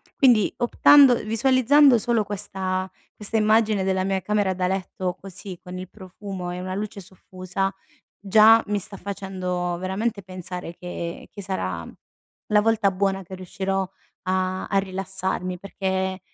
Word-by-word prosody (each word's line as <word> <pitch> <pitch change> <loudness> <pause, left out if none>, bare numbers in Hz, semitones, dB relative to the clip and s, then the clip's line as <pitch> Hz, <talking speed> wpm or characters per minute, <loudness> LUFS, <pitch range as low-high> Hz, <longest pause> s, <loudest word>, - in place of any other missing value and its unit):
Quindi 240 -7 +4
optando 260 +2 +6
ehm, - - -7
visualizzando 255 +4 +5
solo 230 0 +1
questa 190 -2 -3 0.3
questa 210 +1 -4
immagine 215 -2 +3
della 190 0 0
mia 195 0 0
camera 205 -1 +1
da 180 0 -1
letto 185 -1 -3
così, 190 -1 -9
con 180 0 -8
il 185 0 -7
profumo 190 -2 -7
e 180 - -5
una 185 0 -4
luce 205 +1 -4
soffusa, 185 +1 -4 0.5
già 220 +3 +6
mi 205 0 0
sta 200 +1 -7
facendo 185 -2 -3
veramente 200 +4 -2
pensare 180 -2 -7
che 170 -1 -6
che 200 - -9
sarà 95 - -3 0.6
la 210 0 +4
volta 220 -2 +2
buona 195 0 -1
che 190 +1 -10
riuscirò 190 +1 -2 0.4
a 185 0 -1
a 195 - +1
rilassarmi. 190 -1 -3
Perché 190 0 -2
190 Hz, 145 wpm, -24 LUFS, 185-210 Hz, 0.6 s, optando